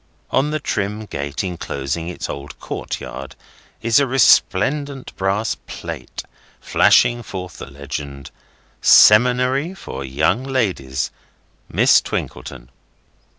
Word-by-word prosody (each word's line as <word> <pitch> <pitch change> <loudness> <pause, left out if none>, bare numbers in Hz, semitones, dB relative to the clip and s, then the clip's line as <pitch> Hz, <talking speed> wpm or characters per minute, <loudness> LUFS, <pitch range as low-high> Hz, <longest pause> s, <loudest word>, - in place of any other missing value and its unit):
On 140 +3 +2
the 155 0 -1
trim 105 -4 -3
gate 70 -4 -4
enclosing 80 -3 -4
its 90 - -5
old 70 +1 -8
courtyard 70 0 -6 0.5
is 115 +3 +4
a 140 - +2
resplendent 135 +2 +2
brass 100 +3 0
plate - - -7 0.4
flashing 120 0 +4
forth 90 -5 -8
the - - -8
legend: 70 0 -7 0.5
"Seminary 125 - +5
for 70 - -7
Young 75 - 0
Ladies. 95 - -1 0.6
Miss - - +5
Twinkleton." 65 -1 -6
95 Hz, 105 wpm, -20 LUFS, -, 0.6 s, Seminary